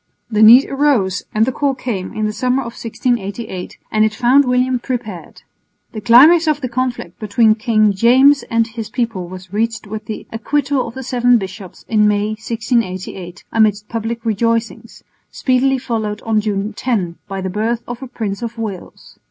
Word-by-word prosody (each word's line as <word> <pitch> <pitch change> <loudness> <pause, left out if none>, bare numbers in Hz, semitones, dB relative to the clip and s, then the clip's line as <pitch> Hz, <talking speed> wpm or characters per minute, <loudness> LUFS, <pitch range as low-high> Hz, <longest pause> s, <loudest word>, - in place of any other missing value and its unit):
The 215 0 +1
need 235 +5 +8
arose 255 -10 +1
and 215 +1 +2
the 260 - -1
call 275 +1 -1
came 220 -8 -4
in 215 - -2
the 215 - -2
summer 255 +3 0
of 235 -1 -7
1688, 225 -4 -4
and 215 0 +3
it 215 0 +1
found 255 +3 +4
William 250 0 +1
prepared. 235 -8 -6 0.5
The 215 - -7
climax 300 +10 +6
of 305 -2 +1
the 255 -3 -4
conflict 240 -8 -3
between 215 +1 +3
King 215 -2 +2
James 260 +7 +5
and 230 -1 +2
his 225 -1 -7
people 230 -8 -3
was 185 +1 -11
reached 225 +2 -1
with 215 +1 -7
the 215 - -6
acquittal 275 +4 -1
of 230 - -9
the 265 - -6
Seven 245 -1 +3
Bishops 190 -2 -8
in 210 -2 +3
May, 210 0 +1
1688, 215 -5 -3
amidst 210 -2 +1
public 230 +1 -4
rejoicings, 230 +1 -2 0.3
speedily 265 +1 +1
followed 220 -4 -3
on 220 -1 +1
June 205 0 -2
10 190 -9 -2
by 195 -1 -5
the 190 0 -3
birth 225 +4 -1
of 240 +1 -6
a 265 - -6
Prince 215 -5 -5
of 235 0 -5
Wales. 210 -5 -8
225 Hz, 175 wpm, -17 LUFS, 210-250 Hz, 0.5 s, need